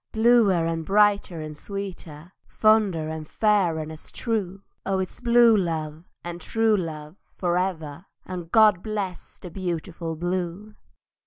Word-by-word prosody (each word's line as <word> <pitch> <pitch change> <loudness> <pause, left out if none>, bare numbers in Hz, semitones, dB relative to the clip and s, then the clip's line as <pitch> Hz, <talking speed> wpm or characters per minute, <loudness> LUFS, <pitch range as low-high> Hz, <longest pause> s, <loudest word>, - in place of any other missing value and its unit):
Bluer 220 -6 +4
and 165 0 -2
brighter 200 -3 +2
and 155 -1 -7
sweeter, 175 -3 -7 0.2
Fonder 210 -7 +2
and 160 -1 -6
fair 200 -6 +2
and 155 0 -5
as 155 - -12
true; 200 -5 -3 0.2
Oh 195 0 0
it's 190 -1 -3
blue 235 -2 +5
love 160 -3 -3
and 175 0 -6
true 225 -1 +2
love 160 -2 -5 0.2
for 175 -2 0
ever! 175 -3 -3 0.2
And 175 -2 -7
God 215 -5 +5
bless 205 -4 -5
the 180 - -10
beautiful 170 -2 -4
blue! 180 +4 -3
180 Hz, 140 wpm, -25 LUFS, 165-205 Hz, 0.2 s, blue